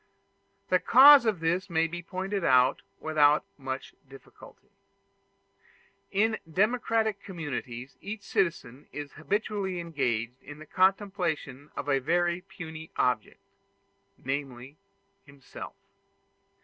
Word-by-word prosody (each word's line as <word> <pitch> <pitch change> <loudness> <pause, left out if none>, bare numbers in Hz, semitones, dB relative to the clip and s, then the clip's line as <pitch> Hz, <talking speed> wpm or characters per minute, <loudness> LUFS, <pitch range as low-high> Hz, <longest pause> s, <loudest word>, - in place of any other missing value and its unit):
The 185 - +4
cause 270 +2 +8
of 200 -7 0
this 175 +4 0
may 165 -1 +2
be 175 +1 -5
pointed 190 +3 -4
out 130 -2 +4 0.2
without 150 -1 +3
much 135 -1 -6 0.2
difficulty. 135 -1 -16 1.4
In 220 +3 +1
democratic 220 +1 +1
communities 140 -8 -6
each 205 0 -6
citizen 155 -7 -2
is 145 -1 -7
habitually 195 +1 -2
engaged 125 -8 -2
in 145 - -11
the 155 - -11
contemplation 180 -7 0
of - - -5
a 135 -1 +2
very 175 +5 0
puny 160 -4 -9
object, 125 -4 -1 0.7
namely 135 0 -5 0.5
himself. 140 -2 -11
165 Hz, 105 wpm, -28 LUFS, 140-195 Hz, 1.4 s, cause